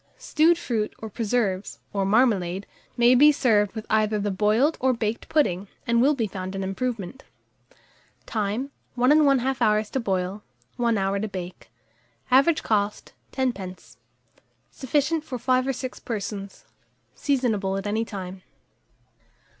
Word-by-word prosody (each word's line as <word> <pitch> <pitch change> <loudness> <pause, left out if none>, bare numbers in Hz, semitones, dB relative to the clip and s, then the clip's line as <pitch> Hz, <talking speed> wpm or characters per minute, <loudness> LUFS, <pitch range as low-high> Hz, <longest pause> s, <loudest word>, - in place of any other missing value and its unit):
Stewed 325 +2 +3
fruit, 220 -8 -2
or 220 -1 -8
preserves, 205 -3 -1 0.2
or 195 -1 0
marmalade, 200 -5 +2 0.3
may 240 +1 +6
be 290 +4 +7
served 210 -8 +2
with 220 0 -5
either 215 0 +2
the 205 0 -1
boiled 215 +10 +2
or 260 0 +2
baked 230 -1 -3
pudding, 200 - +1 0.2
and 235 0 +2
will 290 +4 +4
be 235 -4 0
found 190 -1 -6
an 195 - -3
improvement. 220 +3 -4 1.0
Time. 220 +5 -2 0.2
1 250 +2 +3
1/2 275 -4 +3
hour 215 0 +3
to 220 +5 -4
boil, 190 -2 -2 0.4
1 235 -2 +1
hour 195 0 0
to 215 - -2
bake. 185 -3 -8 0.6
Average 275 +5 +4
cost, 210 -1 -1 0.2
10d. 205 -9 -4 0.7
Sufficient 295 +4 0
for 260 -5 -5
5 255 +2 +1
or 270 - +1
6 255 0 -6
persons. 200 -3 -6 0.5
Seasonable 220 -9 0
at 195 - -5
any 215 +2 0
time. 190 -4 -7
220 Hz, 140 wpm, -25 LUFS, 200-255 Hz, 1.0 s, be